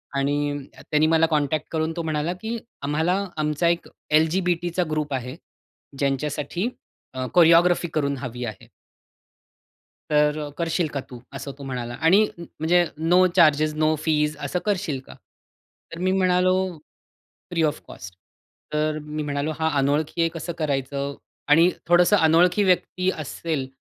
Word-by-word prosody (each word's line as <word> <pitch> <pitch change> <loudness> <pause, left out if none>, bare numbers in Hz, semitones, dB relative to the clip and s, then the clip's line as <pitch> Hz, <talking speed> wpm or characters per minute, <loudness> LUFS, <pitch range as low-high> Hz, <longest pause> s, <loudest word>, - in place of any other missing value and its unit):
आणि 145 0 -1
त्यांनी 155 0 +1
मला 165 0 +4
कॉन्टॅक्ट 150 0 0
करून 160 0 -1
तो 170 - -1
म्हणाला, 155 +2 -1
की 225 +1 -3 0.2
"आम्हाला, 160 +6 0 0.2
आमचा 150 +2 0
एक 170 0 -1 0.2
एल-जी-बी-टीचा 175 +2 +1
ग्रुप 150 -2 -2
आहे. 130 0 -4 0.6
ज्यांच्यासाठी 145 - -1 0.4
अ, 130 -1 -3
कोरिओग्राफी 175 0 +5
करून 140 -2 0
हवी 125 -2 -6
आहे. 110 -4 -8 1.4
तर 150 0 +3
अ, 150 -1 -4
करशील 170 0 0
का 140 - -1
तू 125 - -9
असं, 135 +1 -6
तो 140 - -10
म्हणाला 125 -3 -5
आणि 190 +7 +5
म्हणजे 170 +1 +1
नो 175 +4 +4
चार्जेस, 155 -3 +4
नो 155 0 +2
फीस 150 -1 +1
असं 180 - -1
करशील 180 -9 -1
का? - - -10 0.8
तर 165 - -7
मी 185 +1 +1
म्हणालो 185 -1 +3 1.0
फ्री 165 -2 +1
ऑफ 150 -1 0
कॉस्ट, 90 0 -10 0.6
तर 155 0 0
मी 150 0 -5
म्हणालो, 145 +1 -2
हा 160 - +2
अनोळखी 145 +4 0
आहे, 165 - +3
कसं 170 +1 -5
करायचं? 140 -1 -2 0.3
आणि 165 +4 +6 0.2
थोडंसं 175 +4 +5
अनोळखी 175 +4 +4
व्यक्ती 185 0 +1
असेल, 155 -1 -3
155 Hz, 140 wpm, -24 LUFS, 145-175 Hz, 1.4 s, आणि